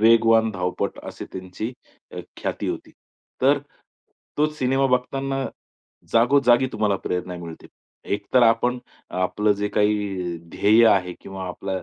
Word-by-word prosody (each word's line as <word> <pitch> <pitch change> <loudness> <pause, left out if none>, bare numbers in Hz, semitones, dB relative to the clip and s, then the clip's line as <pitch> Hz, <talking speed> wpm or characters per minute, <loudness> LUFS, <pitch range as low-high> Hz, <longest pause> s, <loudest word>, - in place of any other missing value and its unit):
वेगवान 115 0 +5
अ, - - -1
धावपटू 90 -1 -2
अशी - - -7
त्यांची 95 +5 -5 0.4
अ, - - -6 0.2
ख्याती - - -3
होती. - - -5 0.5
तर 140 +2 +5 0.8
तोच 150 0 +1
सिनेमा 135 +1 +2
बघताना 135 +2 -1 0.7
जागोजागी 125 +1 +4
तुम्हाला 105 -2 +1
प्रेरणा 90 0 -3
मिळते. 85 -2 -9 0.5
एक 100 0 -6
तर 125 - +7
आपण 120 +2 +3 0.3
अ, - - -9
आपलं 105 +3 +2
जे 105 0 -2
काही 100 -4 0
ध्येय 105 +6 +5
आहे 90 -4 +2
किंवा 95 -1 -7
आपला 95 +1 -4
110 Hz, 135 wpm, -23 LUFS, 95-125 Hz, 0.8 s, तर